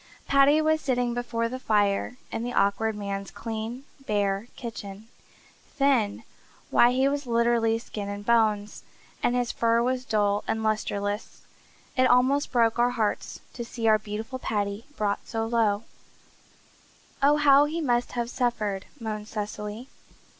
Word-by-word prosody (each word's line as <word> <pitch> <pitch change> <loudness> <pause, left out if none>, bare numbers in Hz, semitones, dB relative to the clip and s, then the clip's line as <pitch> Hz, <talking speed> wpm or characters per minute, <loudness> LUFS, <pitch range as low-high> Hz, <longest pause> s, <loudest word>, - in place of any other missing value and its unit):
Paddy 280 +3 +5
was 315 0 +2
sitting 245 -3 0
before 235 -1 -1
the 255 +2 -5
fire 210 +1 +1
in 225 - -3
the 245 +1 -3
Awkward 210 +2 +1
Man's 200 -1 -4
clean, 225 +3 -5 0.2
bare 205 0 0
kitchen. 215 -3 -8 0.7
Thin! 270 -7 +2 0.5
Why, 240 - +6
he 260 +2 +2
was 285 -1 -2
literally 235 -1 +2
skin 210 -3 -6
and 205 0 -6
bone, 215 -3 +3 0.5
and 240 - +1
his 245 -1 0
fur 230 0 +2
was 255 +1 0
dull 205 -3 +1
and 220 0 -1
lustreless. 205 -1 -2 0.5
It 255 0 +4
almost 260 +3 +3
broke 230 -2 +2
our 240 +1 +4
hearts 220 -4 -2
to 240 - -5
see 230 -1 -3
our 215 -1 +5
beautiful 220 +4 -5
Paddy 205 -1 -2
brought 205 -1 0
so 225 -1 -2
low. 225 -2 +1 1.4
"Oh, 290 +2 +5
how 285 -1 +6
he 315 +3 -3
must 245 -6 0
have 240 0 -2
suffered!" 215 -6 -1
moaned 215 -2 -5
Cecily. 210 +2 -5
230 Hz, 145 wpm, -26 LUFS, 210-250 Hz, 1.4 s, Why